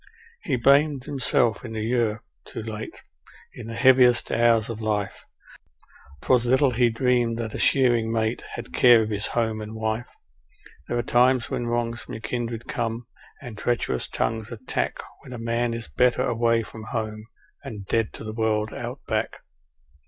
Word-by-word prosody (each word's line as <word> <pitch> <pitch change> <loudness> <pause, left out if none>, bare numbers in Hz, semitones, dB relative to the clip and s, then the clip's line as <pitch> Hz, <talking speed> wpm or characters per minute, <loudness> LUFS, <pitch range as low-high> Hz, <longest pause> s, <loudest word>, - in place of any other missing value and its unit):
He 140 - -1
blamed 140 +2 +3
himself 125 -5 0
in 115 -2 -7
the 110 -1 -3
year 115 -2 0 0.2
'Too 115 - -7
Late' 110 0 -7 0.5
in 115 - -9
the 115 - -6
heaviest 125 0 +5
hours 115 -1 +3
of 115 -1 -6
life 105 -2 -2 1.0
'Twas 125 -2 +3
little 130 +2 +3
he 120 0 +3
dreamed 120 0 +1
that 115 -2 -4
a - - -4
shearing 120 -4 +3
mate 110 +1 0
had 65 - -8
care 120 - +6
of 110 - -4
his 105 0 -2
home 110 -2 -1
and 110 +1 -7
wife; 110 +1 -2 0.8
There 120 - -1
are 120 - 0
times 125 +1 +3
when 120 - -2
wrongs 120 0 -1
from - - -8
your 110 - -8
kindred 115 0 -4
come, 115 0 -3 0.4
and 120 -4 -7
treacherous 115 - -1
tongues 110 - -2
attack 115 - -3 0.2
When 125 - -10
a - - -5
man 115 +1 -1
is 115 0 -4
better 125 -1 +2
away 115 0 +2
from 110 0 -10
home, 110 -1 -4 0.4
and 105 -3 -7
dead 115 +2 0
to - - -9
the 110 0 -5
world, 110 -1 0
Out - - -6
Back. - - -2
115 Hz, 170 wpm, -25 LUFS, 110-120 Hz, 1.0 s, care